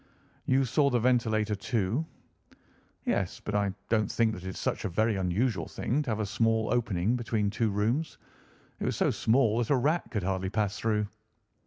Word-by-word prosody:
"You 135 +1 +3
saw 140 +4 +3
the 125 -2 +2
ventilator, 110 -3 +2
too?" 110 - -1 1.0
"Yes, - - -1
but 105 - -5
I 100 -1 +2 0.2
do 115 - +4
not 105 - -1
think 115 -2 +2
that 90 - -8
it 95 - -4
is 95 - -7
such - - -2
a - - -1
very 110 +5 +1
unusual 95 0 0
thing 135 +6 -1
to 145 - -4
have 110 -1 -1
a - - 0
small 110 +1 +1
opening 110 -2 +1
between 110 -4 -1
two 110 +1 0
rooms. 115 +10 -1 0.6
It - - -2
was - - 0
so - - +2
small 115 -1 +2
that 120 - -1
a 140 - +4
rat 150 +3 +1
could 105 -6 -2
hardly 95 0 -1
pass 105 -1 -1
through." 105 -2 +1
110 Hz, 195 wpm, -29 LUFS, 100-120 Hz, 1.0 s, do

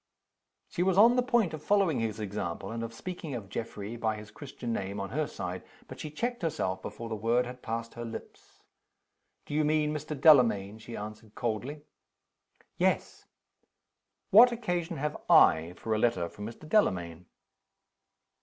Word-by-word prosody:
She 185 - -3
was 185 0 +2
an 230 +4 +7
the 250 - +4
point 240 -8 +2
of 155 - -6
following 190 -6 +2
his 110 -1 -2
example, 100 -3 -4
and 115 0 -4
of 115 0 -4
speaking 160 +2 -6
of 105 -5 -7
Geoffrey 105 0 -5
by 110 -2 0
his 105 0 -10
Christian 120 0 -6
name, 100 -1 -3
on 100 +1 -4
her 150 +3 0
side. 90 +1 -5 0.3
But - - -10
she 155 - -5
checked 240 +10 -3
herself, 145 - -1
before 115 - -7
the 115 - -4
word 115 +4 +1
had 125 +1 -9
passed 115 0 -4
her 120 - -6
lips. 115 -1 -10 0.8
"Do - - -7
you 155 +1 +2
mean 150 0 +2
Mr. 150 -1 -5
Delamayn?" 115 -9 +5
she 115 +1 -8
asked, 105 +1 -9
coldly. 125 +6 -3 0.9
"Yes." - - 0 1.1
"What 235 +5 +9
occasion 175 -7 -2
have 150 +2 -2
I 80 +2 +6
for 110 +4 -3
a 110 - +1
letter 100 -7 +1
from 105 +1 -8
Mr. 120 +7 -10
Delamayn?" 90 - +1
120 Hz, 165 wpm, -30 LUFS, 105-155 Hz, 1.1 s, What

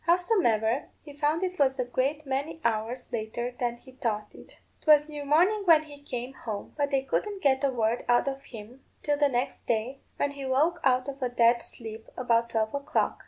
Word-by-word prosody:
Howsomever, 300 - +2 0.2
he 290 - -11
found 300 +4 0
it 370 0 -3
was 270 -1 +3
a 250 - 0
great 275 +5 -1
many 280 +4 -3
hours 235 +3 -1
later 235 +2 -3
than 240 -1 -1
he 260 - -16
thought 215 -5 -3
it; - - -15 0.2
'twas 300 -1 +5
near 295 -1 -6
morning 350 +9 +3
when 325 -3 +6
he 290 -2 -13
came 250 -2 -5
home; 215 -6 -6
but 285 -1 0
they 270 -1 +1
couldn't 400 +8 -2
get 265 -1 +3
a 280 - +4
word 235 -2 0
out 240 +3 +4
of 275 0 -4
him 235 +3 -11 0.2
till 290 -1 +1
the 290 -1 +4
next 245 -1 -2
day, 235 +4 -1 0.2
when 285 - 0
he 280 -1 -8
woke 295 +7 +2
out 255 0 +3
of 275 0 -6
a 250 - 0
dead 235 0 +4
sleep 225 -1 -9
about 235 -2 +2
twelve 220 -1 0
o'clock." 280 0 0
265 Hz, 205 wpm, -28 LUFS, 235-290 Hz, 0.2 s, when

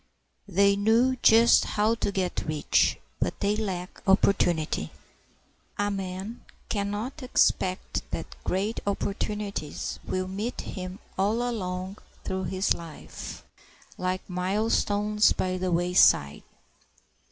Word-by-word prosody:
They 200 +1 +4
knew 225 +6 +3
just 230 +1 +6
how 215 +2 +1
to 230 -3 -1
get 185 -4 -2
rich, 155 -1 +2 0.2
but - - -2
they 205 0 +1
lacked 190 -4 -4
opportunity. 175 - +2 0.9
A 205 0 0
man 195 +3 -5 0.3
can 200 -2 -1
not 215 +6 -4
expect 185 -7 +1
that - - -5
great 200 +5 -1
opportunities 200 -4 -3
will 185 0 -2
meet 205 +6 -3
him 185 -1 -6 0.2
all 220 +5 +1
along 185 -4 -4 0.2
through 190 0 -2
his 190 +1 +1
life 165 -2 -9 0.5
like 185 0 -2
milestones 205 +2 +2
by 185 0 -1
the 185 0 -1
wayside. 170 - +4
195 Hz, 110 wpm, -27 LUFS, 185-210 Hz, 0.9 s, just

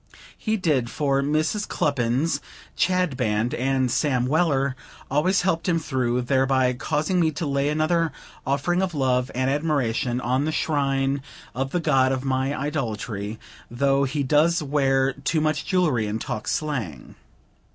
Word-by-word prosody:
He 220 0 -1
did; 145 - +1
for 140 -1 0
"Mrs. 155 +8 0
Cluppins," 140 +2 0 0.4
"Chadband," 125 -12 +1
and 130 0 0
"Sam 125 -4 +1
Weller," 140 -2 +1 0.4
always 175 +7 +2
helped 170 -2 0
him 170 - +3
through; 125 -5 -1
thereby 130 0 +2
causing 150 +9 -1
me 165 -2 +3
to 155 - -3
lay 140 0 0
another 155 +1 +1 0.3
offering 145 +7 0
of 185 -4 -2
love 130 -2 +1
and 130 +1 0
admiration 130 -5 0
on 130 +3 0
the 155 - 0
shrine 140 -3 0 0.3
of 135 +1 -2
the 175 - -1
god 135 -5 +3
of 135 0 -2
my 130 +1 0
idolatry, 110 -7 -3 0.3
though 135 +3 +2
he 140 +2 -1
does 155 +5 +3
wear 135 -2 +2
too 140 +4 -1
much 155 -1 -1
jewelry 155 - +1
and 105 +2 -2
talk 115 -2 -5
slang. 120 - -3
140 Hz, 145 wpm, -24 LUFS, 130-155 Hz, 0.4 s, him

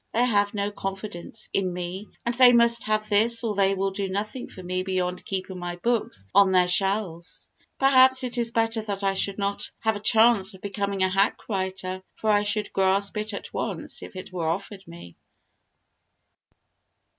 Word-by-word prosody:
They 240 +2 +4
have 205 -3 +1
no 200 0 -1
confidence 195 0 -6
in 190 -2 0
me 180 +3 -5 0.2
and 235 - 0
they 250 0 +7
must 235 0 +4
have 215 0 0
this 225 +3 +3
or 225 -2 -1
they 195 -1 +2
will 195 0 -1
do 195 0 -3
nothing 210 +6 -4
for 185 - -11
me 185 +1 -2
beyond 180 -1 -2
keeping 190 -1 -5
my 175 0 -4
books 205 - -2
on 200 -1 +5
their 180 -1 +4
shelves. 180 -2 -1 0.3
Perhaps 260 -1 +5
it 245 -1 -3
is 235 -1 +1
better 225 -1 0
that 200 -2 -5
I 195 0 +2
should 195 0 -1
not 200 0 -2
have 220 -1 +1
a - - -5
chance 220 -2 +3
of 190 - -16
becoming 200 -1 -2
a - - +4
hack 195 +2 0
writer, 190 -2 -3
for 220 - 0
I 205 0 +4
should 205 0 -1
grasp 195 +1 +1
it 215 +1 -3
at 200 - -8
once - - -4
if - - -10
it 185 0 -9
were 165 -3 -1
offered 195 +2 -5
me. 170 - -12
200 Hz, 185 wpm, -25 LUFS, 190-220 Hz, 0.3 s, they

